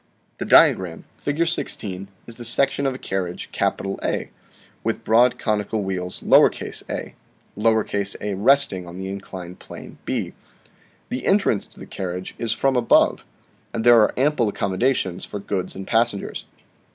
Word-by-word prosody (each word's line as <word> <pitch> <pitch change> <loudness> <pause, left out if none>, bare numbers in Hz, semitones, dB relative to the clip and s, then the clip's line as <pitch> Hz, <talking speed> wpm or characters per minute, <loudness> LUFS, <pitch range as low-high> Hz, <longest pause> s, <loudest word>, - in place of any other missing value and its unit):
The - - -2
diagram, - - +4
Fig. 155 +4 0
16, 100 - -3 0.2
is 115 - -10
the 120 - -8
section 135 +4 +2
of 130 - -1
a - - -5
carriage 95 -6 -4
A, 95 0 -1 0.5
with - - -2
broad 120 +3 +4
conical 105 0 -1
wheels 90 -1 -4
a, - - +5 1.3
a, 100 0 -2
resting 100 -3 +3
on 85 +1 -9
the 95 0 -5
inclined 95 -2 -8
plane - - -11
b. - - -2 0.8
The 125 - -3
entrance 195 - +2
to - - -18
the - - -8
carriage 90 -1 -5
is 115 - -1
from 135 -1 +1
above, 120 -2 +3 0.5
and 115 - -1
there 120 -1 +7
are 105 - +4
ample 130 -4 +2
accommodations 100 -1 0
for - - -5
goods 100 -2 -3
and 95 0 -6
passengers. 115 -2 0
105 Hz, 140 wpm, -22 LUFS, 95-125 Hz, 1.3 s, there